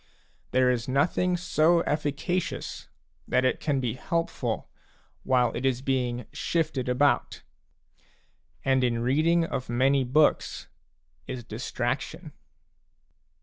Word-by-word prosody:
There 130 0 +3
is 120 -2 -2
nothing 175 +7 +1
so 170 -1 +3
efficacious 150 - -2 0.4
that 130 - +2
it 130 - +1
can 145 -3 0
be 120 -4 -1
helpful 165 +6 -2 0.5
while 125 -2 +2
it - - -3
is 130 -1 0
being 125 -3 -1
shifted 150 -7 -1
about. 140 +3 +1 1.2
And 130 -1 +3
in 120 -1 +1
reading 160 +6 +3
of 135 -6 -4
many 135 +3 +3
books 145 +5 +2 0.6
is 130 -2 -5
distraction. - - -4
135 Hz, 105 wpm, -27 LUFS, 125-155 Hz, 1.2 s, There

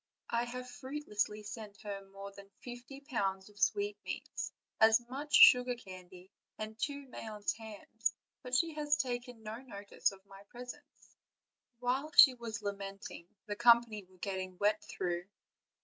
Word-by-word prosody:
I 235 +1 +2
have 250 +1 -6
fruitlessly 245 -5 -3
sent 210 -2 -8
her 200 -1 -5
more 195 0 -8
than 200 0 -13
fifty 245 +3 -9
pounds 195 -8 -2
of 205 0 -17
sweet 405 - +1
meats, - - -4 0.3
as 220 +1 +7
much 280 +3 -1
sugar 250 0 +9
candy, 185 -3 -12 0.3
and 215 0 -5
two 285 +3 -3
Mayence 215 -3 -3
hams; 220 0 -3 0.3
but 250 0 -2
she 330 +4 +3
has 295 -1 +2
taken 245 -4 -3
no 215 +1 -5
notice 205 -7 -2
of 195 0 -15
my 195 0 -13
presents." 250 +4 -11 0.6
While 255 +5 0
she 265 - +10
was 230 -3 -6
lamenting, 195 -3 -5 0.2
the 205 -1 -3
company 235 -2 +5
were 185 0 -22
getting 185 -1 -4
wet 210 +2 +2
through. 175 -1 -3
220 Hz, 150 wpm, -34 LUFS, 200-250 Hz, 0.6 s, she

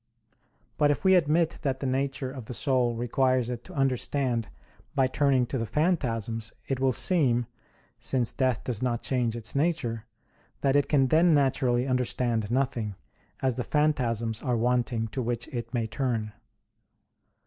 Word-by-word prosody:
But 145 - +4
if 145 +6 -1
we 190 - +6
admit 165 -1 +2
that 135 -3 -1
the 135 - -4
nature 135 0 -1
of 130 -4 -8
the 125 - -5
soul 125 -3 +1
requires 125 +1 +1
it 120 -1 -5
to 185 - -11
understand 130 -3 0 0.5
by 135 - +4
turning 130 -1 +2
to 130 +2 -3
the 115 - -1
phantasms, 115 - -1 0.2
it 135 -2 -1
will 135 0 +3
seem, 125 -5 +2 0.5
since 125 -3 +1
death 130 -4 0
does 120 -3 -3
not 120 -2 -1
change 120 -3 0
its 115 -1 -6
nature, 130 -8 -1 0.5
that 135 -1 +2
it 145 -1 +2
can 135 -3 +3
then 165 +2 +5
naturally 130 -3 +2
understand 125 -4 0
nothing; 120 -5 -1 0.5
as 130 -2 +1
the 125 - -1
phantasms 120 -8 0
are 125 -4 0
wanting 120 -1 0
to 130 - -3
which 120 0 -2
it 120 -2 -5
may 120 -3 -1
turn. 110 -2 -2
125 Hz, 160 wpm, -27 LUFS, 115-140 Hz, 0.5 s, we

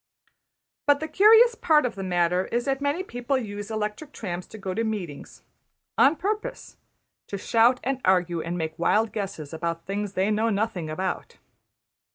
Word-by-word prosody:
But 285 0 +5
the 315 - -3
curious 445 +8 +6
part 315 - +3
of 240 - -1
the 195 - -7
matter 180 0 +1
is 240 +1 -2
that 270 0 -1
many 285 +6 0
people 245 -2 -2
use 205 -3 -5
electric 215 +7 -4
trams 180 -4 -5
to - - -11
go 190 -3 -4
to 225 - -1
meetings, 195 -10 -5 0.5
on 280 +4 +5
purpose 430 - -4 0.5
to 200 - -4
shout 235 +5 +3
and 270 0 -2
argue 175 -3 +2
and 170 +2 -4
make 160 0 -4
wild 215 +6 +2
guesses 195 -8 -5
about 165 +1 -3
things 200 0 -3
they 195 +3 +1
know 220 +2 +1
nothing 200 -6 -1
about! 185 +4 -4
210 Hz, 170 wpm, -25 LUFS, 180-270 Hz, 0.5 s, curious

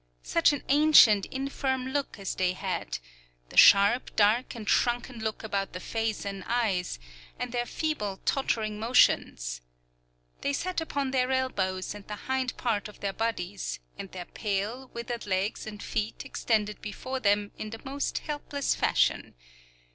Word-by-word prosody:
Such - - +4
an 290 - -3
ancient, 280 -9 +7
infirm 265 -1 -2
look 280 -2 -2
as 195 -2 -3
they 180 -1 +1
had, - - -3 0.5
the - - -12
sharp, 200 +5 +6
dark, 220 +5 +3
and 220 -3 -8
shrunken 240 0 +1
look 220 0 -3
about 200 -2 -2
the 180 - -5
face 225 +2 -2
and 195 -1 -5
eyes, 215 -7 0 0.4
and 245 - -4
their 240 0 -1
feeble, 210 -12 -2
tottering 215 -6 0
motions! - - +2 0.8
They 280 - 0
sat 360 +4 -1
upon 280 -4 -2
their 255 -1 +1
elbows 195 -9 -1
and 205 -1 -11
the 210 - -4
hind 260 -1 -1
part 220 -5 -1
of 210 - -14
their 195 -1 -1
bodies, 175 - -3 0.2
and 195 - -7
their 180 -1 -6
pale, 215 +7 -3
withered 235 -1 -5
legs 195 +3 -1
and 210 -1 -7
feet 215 -1 -3
extended 210 -2 -1
before 260 +5 -4
them 205 -2 +2
in 215 - -4
the 225 +1 -8
most 275 +1 -2
helpless 290 -1 -1
fashion. - - +1
220 Hz, 155 wpm, -28 LUFS, 200-260 Hz, 0.8 s, ancient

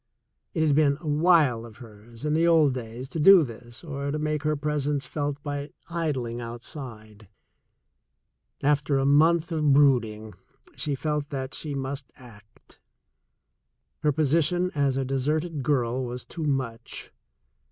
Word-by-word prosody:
It 160 -1 +2
had 145 -2 +3
been 145 -2 +3
a 165 - -9
wile 150 -6 +3
of 115 -2 -12
hers 115 +2 -12
in 150 - +1
the 165 +2 +3
old 160 -5 +5
days 120 +1 -6
to 165 - -4
do 190 +2 +8
this 120 0 -10
or 140 -3 -4
to 150 - -1
make 155 -1 -1
her 155 0 0
presence 145 -1 -1
felt 145 +1 -3
by 145 0 -5 0.2
idling 130 -8 -2
outside. 115 -3 -9 1.4
After 145 0 +2
a 135 - +1
month 160 +4 +4
of 150 -3 +2
brooding, 115 -7 +2 0.4
she 145 -2 -1
felt 150 +1 -2
that 135 -3 -4
she 150 -3 -5
must 135 0 -4
act 115 -4 -18 0.6
— 70 +3 -53
her 150 - +3
position 160 +5 +1
as 140 -3 +1
a 135 - 0
deserted 150 +4 -1
girl 130 -2 0
was 125 0 -5
too 165 -2 -6
much. 130 -5 -3
140 Hz, 150 wpm, -26 LUFS, 125-150 Hz, 1.4 s, do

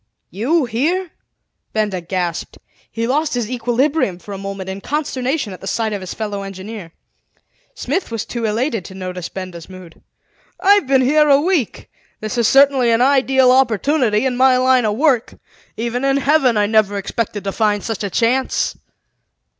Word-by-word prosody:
"You 260 - +1
here?" 315 +10 -1 0.6
Benda 210 -4 -1
gasped. 175 -1 -3 0.3
He 230 0 -2
lost 295 +3 0
his 240 -1 -2
equilibrium 245 - 0
for 200 +3 -10
a - - -5
moment 195 -1 -6
in 190 +1 -6
consternation 275 -4 -2
at 180 - -11
the 195 - -8
sight 220 +2 -1
of 200 - -4
his 185 - -7
fellow 205 -2 -4
engineer. 195 -1 -8 0.8
Smith 310 +10 -2
was 230 -2 -4
too 235 -2 -4
elated 225 - -1
to 190 - -10
notice 185 -2 -6
Benda's 185 -3 -8
mood. 185 -3 -13 0.6
"I've 405 -6 +4
been 265 -1 +4
here 300 +3 +3
a 275 0 +6
week. 320 - -1 0.3
This 215 +3 -4
is 230 - +3
certainly 270 -3 +4
an 230 +1 +3
ideal 265 -1 +4
opportunity 255 -1 +2
in 255 -1 0
my 260 0 +5
line 255 -1 +3
of 210 -1 0
work. 265 -5 +1 0.4
Even 235 +3 -2
in 275 0 +2
Heaven 275 -4 +3
I 205 - +3
never 205 -1 +2
expected 205 +1 -3
to 195 - -2
find 210 -1 0
such 225 -2 -4
a 200 - -2
chance." 245 +6 0
230 Hz, 170 wpm, -18 LUFS, 200-270 Hz, 0.8 s, a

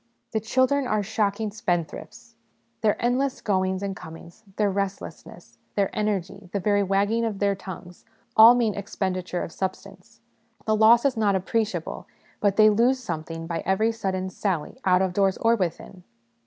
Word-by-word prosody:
The 220 - 0
children 260 +5 +1
are 215 -3 0
shocking 210 0 -1
spendthrifts; 175 -6 -4 0.5
their 215 -2 +2
endless 255 +3 0
goings 190 -2 0
and 195 -1 -3
comings, 165 +3 -12
their 210 -2 +1
restlessness, 195 0 -6 0.2
their 200 -2 0
energy, 195 -2 -2
the 200 - 0
very 205 +1 +2
wagging 200 +4 +1
of 220 -3 -2
their 200 0 +1
tongues, 185 -2 -10 0.3
all 225 +2 +9
mean 230 -4 +1
expenditure 185 -2 -3
of - - -7
substance: 190 0 -6 0.5
the 215 - +2
loss 230 +4 +5
is 270 -2 +2
not 205 -3 +2
appreciable, 190 -2 -2 0.3
but 200 -2 +2
they 215 0 +6
lose 240 +5 +3
something 165 -7 -6
by 165 0 -3
every 215 +4 +1
sudden 190 -4 -3
sally, 185 +3 -3
out 185 0 +4
of 185 -1 -1
doors 195 0 +2
or 230 +1 +3
within. 185 -1 -4
200 Hz, 155 wpm, -25 LUFS, 185-220 Hz, 0.5 s, all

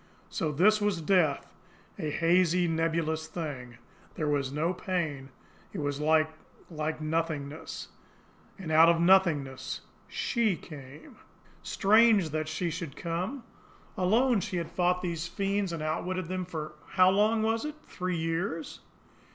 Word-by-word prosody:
So 155 - -1
this 210 +8 +4
was 205 -4 +1
death 160 -3 +1 0.5
a 155 -4 -2
hazy, 175 +2 +3
nebulous 160 -1 0
thing! 130 -9 -6 0.4
There 155 - -2
was 140 -2 0
no 160 +5 0
pain. 160 -8 -3 0.4
It - - -5
was 145 -1 -2
like 155 +1 +3 0.4
like 155 0 -3
nothingness. 155 -1 -3 0.7
And 180 -5 -6
out 160 +1 +7
of 170 - +5
the 165 - 0
nothingness 165 -8 +2 0.3
SHE 230 -6 0
came. 145 -3 -12 0.4
Strange 210 -4 +4
that 155 +1 -2
she 165 +2 -2
should 165 -4 -5
come! 180 +10 -3 0.5
Alone 225 +6 +3
she 180 +1 -3
had 170 -2 -4
fought 180 0 +1
these 170 -2 -2
fiends 195 0 -1
and 165 -2 -4
outwitted 180 +4 -2
them 185 0 -2
for 155 -3 -6 0.2
how 185 -1 +6
long 215 +3 +3
was 225 +1 +1
it? 300 0 -4
Three 180 -1 -3
years! 165 0 -3
165 Hz, 140 wpm, -29 LUFS, 155-185 Hz, 0.7 s, out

